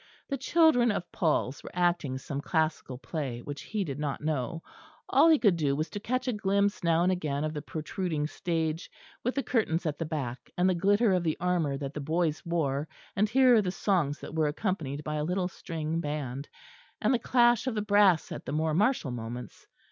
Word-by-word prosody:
The 275 - -1
children 265 -3 +4
of 180 - -4
Paul's 150 -5 0
were - - -9
acting 175 -7 +1
some 140 +1 -5
classical 155 -5 -1
play 130 -4 -4
which 145 0 -6
he 210 -2 -2
did 145 -5 -5
not 145 -2 -2
know: 155 +1 -2 0.4
all 330 - +5
he 315 - +7
could 205 -9 +4
do 145 -4 +1
was 155 +3 -2
to 205 - -4
catch 255 +4 -2
a 250 - +1
glimpse 200 -1 +1
now 165 0 +3
and 185 - +3
again 150 -6 -1
of 155 0 -2
the 150 - -4
protruding 155 0 -3
stage, 160 0 -2 0.3
with 250 - -1
the 275 - 0
curtains 185 -8 0
at 150 -2 -2
the 165 - -1
back, 140 -6 -4
and 180 +1 +3
the 185 - +3
glitter 205 +4 +3
of 180 - +2
the 160 -2 0
armour 170 -6 0
that 140 0 -5
the 150 - -4
boys 160 +1 0
wore; 155 -4 -1 0.3
and 210 +1 +2
hear 250 -2 +6
the 190 - -2
songs 175 -5 0
that - - -8
were 160 -1 +2
accompanied 150 -4 -2
by 150 0 -3
a 150 - -1
little 180 +3 0
string 165 -2 -4
band, 145 -3 -4 0.5
and - - +2
the 245 - +2
clash 240 0 +3
of 250 - -1
the 210 - 0
brass 205 -5 +4
at - - -6
the - - -2
more 155 +1 0
martial 200 - +2
moments. 120 +1 -7
165 Hz, 210 wpm, -29 LUFS, 150-200 Hz, 0.5 s, he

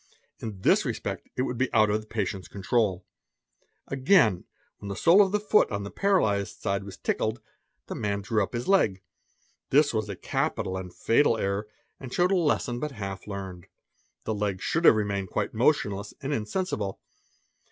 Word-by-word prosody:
In 105 -4 -7
this - - +4
respect - - -4
it 130 - 0
would 125 -2 -3
be 130 - +2
_ - - -18
out 110 -2 +4
of 105 +1 0
the 110 - -17
patient's 100 -4 -3
control. 100 -2 0 0.8
Again, 130 - +3 0.3
when 100 - -7
the 100 - -3
sole 175 - +6
of 195 -2 +3
the 210 - +1
foot 210 +1 +3
on 100 -2 -3
the 100 - -7
paralized 110 - +1
side 100 +1 -1
was 100 -1 -9
tickled 110 +2 -1 0.5
the - - -6
man 100 -1 -2
drew 105 +2 0
up 95 - -2
his 120 +1 -3
leg. 105 - +3 0.7
This 145 0 +4
was 110 -1 -1
a 100 - -4
capital 95 +1 -2
'ee 95 - -3
and 90 -1 -9
fatal 115 +3 +2
error, 100 0 -2 0.3
and 130 -2 -8
showed 180 +5 +2
a - - +4
lesson 145 -8 +1
but 150 +1 -4
half 100 -4 -6
learned. 95 -3 -7 0.6
The 110 - -2
leg 100 -2 -2
should 165 - +1
at - - +13
ave 110 - +3
remained 100 -3 -2
quite - - -2
motionless 100 0 +1
and 145 0 -3
insensible. 110 - -2
105 Hz, 190 wpm, -27 LUFS, 100-135 Hz, 0.8 s, at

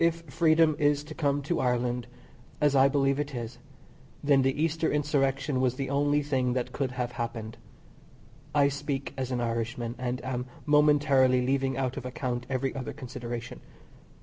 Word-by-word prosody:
If 165 0 +2
freedom 160 +1 +4
is 145 0 +2
to 155 +1 -9
come 145 -2 0
to 170 +4 -1
Ireland 125 -1 0 0.5
as 145 -2 +3
I 135 0 +6
believe 140 0 +1
it 145 -2 -3
is 120 0 -6 0.6
then 140 -1 +4
the 135 +2 0
Easter 160 +1 +1
Insurrection 140 -2 +1
was 130 -1 +1
the 135 0 -3
only 145 +1 +2
thing 130 -3 0
that 125 -1 -2
could 130 -3 -2
have 125 -1 -2
happened. 115 -2 -4 1.0
I 145 -1 +5
speak 140 -1 -4
as 130 -2 -3
an 125 -2 -1
Irishman, 115 0 -2
and 125 0 -2
am 125 -1 -3 0.2
momentarily 145 -4 +4
leaving 135 0 0
out 130 -1 -1
of 130 - -5
account 125 -1 -3
every 130 0 -1
other 130 -2 -4
consideration. 120 -2 -6
135 Hz, 165 wpm, -28 LUFS, 125-145 Hz, 1.0 s, I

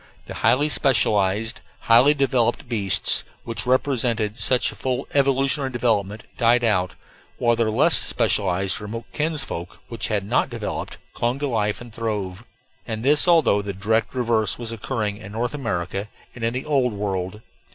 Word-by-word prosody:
The - - -8
highly 145 +4 +2
specialized, 110 -6 +1 0.2
highly 125 +6 +5
developed 130 -3 0
beasts, 105 -5 +3 0.2
which 115 +1 -5
represented 120 -5 0
such 125 0 +2
a - - -13
full 130 0 -3
evolutionary 135 0 +1
development, 110 -3 -1 0.2
died 120 0 +3
out, 95 -5 +1 0.4
while 120 -1 +2
their 115 -1 0
less 110 - +5
specialized 95 0 0
remote 110 +3 -6
kinsfolk, 145 - -3
which 115 - -3
had 105 -3 -1
not 115 +6 0
developed, 115 -4 -5 0.2
clung 120 +2 -1
to 145 +1 -2
life 105 -5 -1
and 120 -2 -11
throve; 105 -3 -4 0.4
and 110 -1 -4
this 150 +5 +4
although 160 -12 +4
the 100 0 -5
direct 110 +5 -1
reverse 115 -5 +1
was 115 -2 -6
occurring 110 -2 -3
in 105 -1 -11
North 120 +3 -2
America 100 -7 -3 0.3
and 120 - -9
in 115 - +1
the 130 - -4
Old 135 -6 +1
World. 100 0 -4
115 Hz, 155 wpm, -22 LUFS, 105-130 Hz, 0.4 s, highly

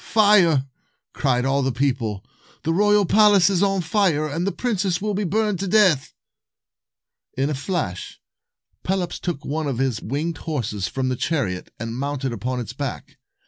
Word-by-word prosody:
Fire!" 190 -10 +4 0.5
cried 125 -2 +1
all 135 +1 +1
the 135 0 0
people. 120 -6 -1 0.4
"The 165 - 0
royal 205 +2 +4
palace 205 -1 +5
is 185 -2 +1
on 195 -1 +2
fire, 165 -4 +1
and 165 +5 -2
the - - +1
princess 195 -7 -1
will 210 +1 -2
be 200 +1 -1
burned 210 +1 0
to 195 - -2
death." 185 -9 +3 1.2
266 135 - 0
In 140 - +1
a - - 0
flash, 140 - -4 0.6
Pelops 180 -2 -2
took 170 -5 -4
one 155 +1 -2
of 135 -4 -2
his 130 -4 -1
winged 145 +6 -3
horses 110 - -3
from 130 +6 -2
the 130 - 0
chariot, 120 - -2
and 115 0 -4
mounted 140 -2 -2
upon 125 +3 -3
its 120 - -6
back. - - -6
155 Hz, 170 wpm, -22 LUFS, 130-195 Hz, 1.2 s, palace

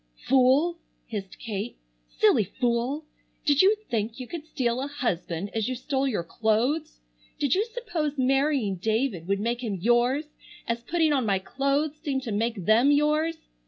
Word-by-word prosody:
"Fool!" 270 +6 +4 0.3
hissed 200 -4 -6
Kate. 220 0 -5 0.3
"Silly - - +3
fool! 245 - -1 0.4
Did 290 -2 +5
you 395 +3 +5 0.2
think 225 +1 -1
you 255 - -5
could 315 +3 -7
steal 250 -4 -1
a 275 - -2
husband 200 - -3
as 220 +1 -1
you 255 - -2
stole 270 +2 -1
your 210 -10 -1
clothes? 230 - 0 0.4
Did 285 - +1
you 390 +3 +3
suppose 415 - -3
marrying 270 -5 +2
David 220 -2 -1
would 200 0 +1
make 235 +3 -2
him 215 -4 -2
yours, 240 - +2 0.4
as 235 0 -1
putting 320 +3 +1
on 265 -3 +2
my 195 -1 +3
clothes 275 +9 -1
seemed 270 -4 -1
to 235 - -4
make 215 -2 -1
them 230 +7 +5
yours? 305 +3 +2
255 Hz, 160 wpm, -26 LUFS, 220-290 Hz, 0.4 s, Did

